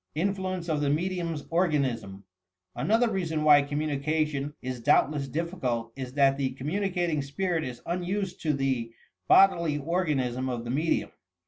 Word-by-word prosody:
INFLUENCE 185 Hz, 0 st, -2 dB
OP 155 Hz, -3 st, 0 dB
THE 145 Hz, -, +1 dB
MEDIUM 170 Hz, +1 st, -1 dB
's 145 Hz, -, -9 dB
ORGANISM 135 Hz, -, 0 dB, 0.5 s
Another 225 Hz, +3 st, +2 dB
reason 160 Hz, -6 st, -1 dB
why 145 Hz, -1 st, +7 dB
communication 150 Hz, 0 st, -1 dB
is 130 Hz, -1 st, -4 dB
doubtless 140 Hz, +3 st, +2 dB
diffi 170 Hz, +6 st, -4 dB
cult 115 Hz, -2 st, -2 dB
is 130 Hz, -2 st, -6 dB
that 135 Hz, -1 st, +3 dB
the 135 Hz, -2 st, -1 dB
communicating 175 Hz, +2 st, -1 dB
spirit 165 Hz, +4 st, -1 dB
is 125 Hz, -3 st, -7 dB
unused 180 Hz, +2 st, -3 dB
to 155 Hz, -2 st, +1 dB
the 130 Hz, -4 st, -1 dB, 0.4 s
bodily 170 Hz, -6 st, +5 dB
organism 140 Hz, -6 st, -1 dB
of 120 Hz, -2 st, -3 dB
the 120 Hz, -, -4 dB
medium. 155 Hz, +5 st, 0 dB
150 Hz, 145 wpm, -27 LUFS, 135-175 Hz, 0.5 s, why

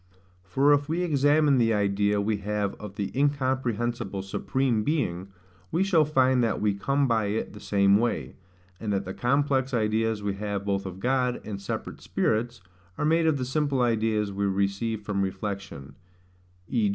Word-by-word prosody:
For 135 Hz, +11 st, +3 dB
if 145 Hz, 0 st, +1 dB
we 170 Hz, +3 st, 0 dB
examine 145 Hz, -3 st, +3 dB
the 115 Hz, -2 st, +3 dB
idea 100 Hz, 0 st, +1 dB
we 105 Hz, +1 st, 0 dB
have 105 Hz, 0 st, -2 dB
of 105 Hz, -2 st, -8 dB
the 100 Hz, +3 st, -4 dB
incomprehensible 125 Hz, -7 st, -1 dB
Supreme 120 Hz, +3 st, 0 dB
Being, 100 Hz, -, -1 dB, 0.4 s
we 180 Hz, -, +2 dB
shall 170 Hz, -6 st, +3 dB
find 130 Hz, -4 st, +3 dB
that 115 Hz, -, 0 dB
we 105 Hz, -1 st, +1 dB
come 140 Hz, +8 st, 0 dB
by 115 Hz, -3 st, +1 dB
it 105 Hz, +2 st, -2 dB
the 105 Hz, -, -10 dB
same 100 Hz, -1 st, +3 dB
way; 120 Hz, +2 st, -1 dB, 0.5 s
and 110 Hz, -2 st, -3 dB
that 100 Hz, 0 st, -1 dB
the 95 Hz, -, -5 dB
complex 135 Hz, +1 st, +1 dB
ideas 110 Hz, -1 st, 0 dB
we 100 Hz, -1 st, -1 dB
have 100 Hz, -1 st, -3 dB
both 100 Hz, -1 st, -1 dB
of 95 Hz, 0 st, -8 dB
God, 125 Hz, +2 st, +1 dB
and 100 Hz, -2 st, -5 dB
separate 100 Hz, -, -5 dB
spirits, 115 Hz, -1 st, -1 dB, 0.4 s
are -, -, -1 dB
made 165 Hz, +1 st, +3 dB
of 155 Hz, -3 st, +2 dB
the 130 Hz, -, -2 dB
simple 140 Hz, 0 st, 0 dB
ideas 110 Hz, -3 st, +1 dB
we 100 Hz, +1 st, -1 dB
receive 100 Hz, +3 st, -1 dB
from 100 Hz, -1 st, -1 dB
reflection; 95 Hz, -8 st, -5 dB, 0.7 s
v. 110 Hz, -1 st, +1 dB
110 Hz, 170 wpm, -26 LUFS, 100-135 Hz, 0.7 s, For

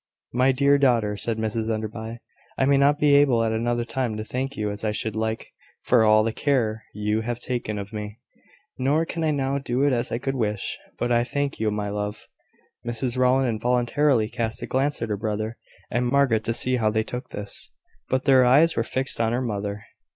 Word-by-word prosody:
"My 130 Hz, +2 st, +4 dB
dear 140 Hz, +2 st, +3 dB
daughter," 115 Hz, -6 st, +2 dB
said 110 Hz, +2 st, -1 dB
Mrs 110 Hz, 0 st, -2 dB
Enderby, 110 Hz, +1 st, -4 dB, 0.4 s
"I 135 Hz, -, +2 dB
may 140 Hz, 0 st, +4 dB
not 140 Hz, +1 st, +4 dB
be 145 Hz, -1 st, +4 dB
able 135 Hz, -5 st, +5 dB
at 110 Hz, -, 0 dB
another 120 Hz, +1 st, 0 dB
time 120 Hz, -3 st, -2 dB
to 110 Hz, -, -3 dB
thank 130 Hz, +4 st, -4 dB
you 105 Hz, -1 st, -1 dB
as 105 Hz, +1 st, -7 dB
I 110 Hz, -, +1 dB
should 110 Hz, 0 st, -2 dB
like 110 Hz, 0 st, -3 dB, 0.3 s
for 120 Hz, -3 st, +4 dB
all 110 Hz, 0 st, +5 dB
the 115 Hz, 0 st, -1 dB
care 115 Hz, -7 st, 0 dB
you 105 Hz, +1 st, -1 dB
have 120 Hz, +1 st, -3 dB
taken 120 Hz, -4 st, -3 dB
of 100 Hz, +2 st, -7 dB
me: 105 Hz, 0 st, -6 dB, 0.6 s
nor 145 Hz, +5 st, +2 dB
can 165 Hz, 0 st, -4 dB
I 160 Hz, -, +2 dB
now 140 Hz, -1 st, 0 dB
do 130 Hz, 0 st, -1 dB
it 145 Hz, -2 st, +3 dB
as 120 Hz, -1 st, -1 dB
I -, -, 0 dB
could 135 Hz, +2 st, -2 dB
wish: 105 Hz, -6 st, -2 dB, 0.2 s
but 120 Hz, -, -1 dB
I 120 Hz, 0 st, +3 dB
thank 140 Hz, +2 st, -2 dB
you, 110 Hz, -1 st, +1 dB
my 105 Hz, -1 st, -2 dB
love." 105 Hz, +1 st, -4 dB, 0.6 s
Mrs 120 Hz, +1 st, -2 dB
Rowland 130 Hz, +1 st, +3 dB
involuntarily 120 Hz, +2 st, +2 dB
cast 115 Hz, -1 st, -3 dB
a -, -, -1 dB
glance 135 Hz, -1 st, 0 dB
at 115 Hz, -, -3 dB
her 105 Hz, -, -1 dB
brother 110 Hz, +1 st, -3 dB, 0.3 s
and 125 Hz, 0 st, +1 dB
Margaret, 125 Hz, -4 st, +2 dB
to 115 Hz, -, 0 dB
see 130 Hz, +1 st, +1 dB
how 110 Hz, -3 st, +2 dB
they 110 Hz, +1 st, 0 dB
took 125 Hz, +3 st, -6 dB
this: 100 Hz, -1 st, -3 dB, 0.4 s
but 130 Hz, 0 st, 0 dB
their 130 Hz, -2 st, +6 dB
eyes 145 Hz, +7 st, +5 dB
were 115 Hz, -, +1 dB
fixed 130 Hz, 0 st, -1 dB
on 115 Hz, 0 st, +1 dB
her 120 Hz, -, +1 dB
mother. 100 Hz, -2 st, -3 dB
120 Hz, 210 wpm, -24 LUFS, 110-130 Hz, 0.6 s, their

